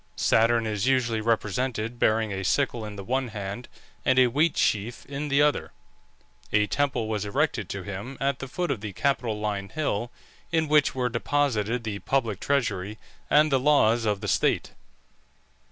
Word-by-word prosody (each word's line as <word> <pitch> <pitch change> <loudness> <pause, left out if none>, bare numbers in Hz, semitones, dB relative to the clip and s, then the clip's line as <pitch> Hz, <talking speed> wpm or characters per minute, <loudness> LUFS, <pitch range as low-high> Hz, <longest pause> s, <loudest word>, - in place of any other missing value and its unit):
Saturn 115 0 +3
is 105 0 -1
usually 120 -4 +2
represented 115 +1 -1
bearing 110 -1 +2
a 95 0 -3
sickle 120 +2 0
in 105 -1 -7
the 100 - -7
one 130 +4 -1
hand 105 +1 -6 0.4
and 130 - +2
a 130 - +7
wheat 145 +7 +1
sheaf 110 +3 0
in 140 +2 -4
the 140 0 +3
other. 150 0 0 0.8
A 105 0 +3
temple 120 +2 0
was 105 -2 -2
erected 100 -1 -1
to - - -5
him 100 +7 -6
at 140 -1 0
the 135 - -5
foot 175 +4 -2
of 115 -7 -3
the 105 -2 -6
Capitoline 105 -6 -1
Hill, 120 -7 -2 0.4
in 160 -2 +1
which 150 -2 +3
were 125 -1 0
deposited 120 -2 0
the 105 -3 -4
public 115 -7 -1
treasury 110 -7 -1 0.3
and 150 +1 +4
the 135 - +3
laws 120 -5 +3
of 105 -2 0
the 105 - -4
state. - - +1
115 Hz, 170 wpm, -26 LUFS, 105-135 Hz, 0.8 s, a